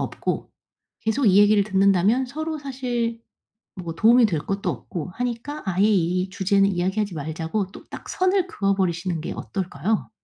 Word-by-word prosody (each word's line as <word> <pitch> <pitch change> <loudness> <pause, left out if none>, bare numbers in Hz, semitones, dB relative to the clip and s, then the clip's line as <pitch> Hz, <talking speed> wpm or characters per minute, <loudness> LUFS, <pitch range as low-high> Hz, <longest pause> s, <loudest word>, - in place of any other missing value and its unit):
없고 - - -3 0.5
계속 225 +4 0
이 195 -1 +5
얘기를 205 0 +6
듣는다면 195 +5 +3
서로 315 +4 -4
사실 245 -4 -3 0.5
뭐 170 -3 -5
도움이 230 +6 +6
될 165 -8 -1
것도 195 +3 -3
없고 160 - -6
하니까 245 +5 -4
아예 190 +1 +2
이 185 -2 +1
주제는 195 +1 +2
이야기하지 190 +2 -1
말자고 160 +6 -3
또 - - -12
딱 - - -9
선을 370 0 +1
그어 200 - 0
버리시는 175 -2 -1
게 - - -4
어떨까요? 190 +3 -3
200 Hz, 335 characters per minute, -23 LUFS, 180-235 Hz, 0.5 s, 얘기를